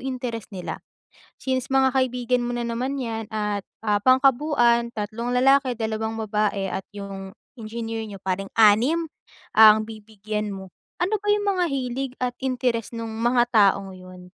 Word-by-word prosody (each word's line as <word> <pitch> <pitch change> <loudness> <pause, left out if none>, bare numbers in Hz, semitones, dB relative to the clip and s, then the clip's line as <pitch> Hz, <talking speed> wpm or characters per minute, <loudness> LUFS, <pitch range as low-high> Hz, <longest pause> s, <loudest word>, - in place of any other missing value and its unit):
interes 245 -5 -5
nila? 180 -2 -6 0.6
Since 260 -1 -2
mga 265 -1 +3
kaibigan 250 -1 +1
mo 240 - -2
na 240 -1 -2
naman 255 +4 -2
yan 225 -3 -4
at 210 -2 -2 0.4
pang-kabuuan 255 -3 +3
3 225 +3 -3
lalaki 260 0 +3
2 220 0 -2
babae 210 -2 -1
at 190 - -3
yung 195 -1 -7 0.3
engineer 225 0 -5
niyo 205 -2 -8
pareng 195 +1 -3
6 245 +10 +4 0.5
ang 215 0 +8
bibigyan 215 -1 -5
mo, 190 -1 -9 0.3
ano 400 +5 +1
ba 415 - -16
yung 415 0 -1
mga 360 - +2
hilig 260 0 -3
at 250 -1 0
interes 250 -3 -1
nung 230 -1 -5
mga 240 +1 +2
taong 200 -3 +3
yon? 185 0 -12
230 Hz, 145 wpm, -24 LUFS, 210-255 Hz, 0.6 s, ang